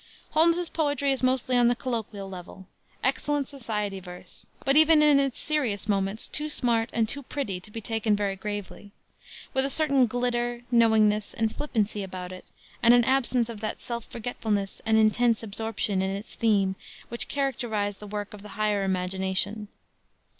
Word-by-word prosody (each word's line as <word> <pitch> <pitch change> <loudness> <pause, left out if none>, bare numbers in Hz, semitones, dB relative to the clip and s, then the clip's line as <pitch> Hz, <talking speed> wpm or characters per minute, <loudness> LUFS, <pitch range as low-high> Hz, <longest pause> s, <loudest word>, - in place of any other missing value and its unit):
Holmes's 335 +2 +4
poetry 285 -4 0
is 265 - -1
mostly 255 0 +2
on 245 -1 +5
the 240 - +3
colloquial 225 -5 -4
level, 190 0 -10 0.4
excellent 290 -2 0
society 210 -8 -3
verse, 180 -1 -11 0.2
but 275 +1 +3
even 310 0 +7
in 295 -2 +6
its 275 -3 0
serious 245 -10 -1
moments 195 +1 0
too 300 +1 -3
smart 235 -5 +1
and 225 -1 +1
too 280 +5 -4
pretty 245 -8 -4
to 185 - -14
be 225 +2 -7
taken 225 -1 0
very 200 -1 -1
gravely; 205 0 -6 0.6
with 265 - +3
a 275 - 0
certain 275 -4 +3
glitter, 240 0 -1
knowingness 220 -3 +3
and 220 -1 0
flippancy 215 -7 -1
about 185 -1 -6
it 185 - -11 0.3
and 235 +1 +7
an 240 - +5
absence 255 -2 +2
of 230 -3 -7
that 215 0 -4
self 235 -2 -5
forgetfulness 215 -4 -3
and 220 0 +4
intense 225 +1 +3
absorption 215 -2 -2
in 190 - 0
its 200 +3 -6
theme 200 -4 +2 0.4
which 235 - -1
characterize 230 -7 -1
the 210 - -10
work 205 0 -5
of 210 - -10
the 210 - -11
higher 210 -2 +1
imagination. 190 +3 -1
225 Hz, 170 wpm, -27 LUFS, 205-255 Hz, 0.6 s, even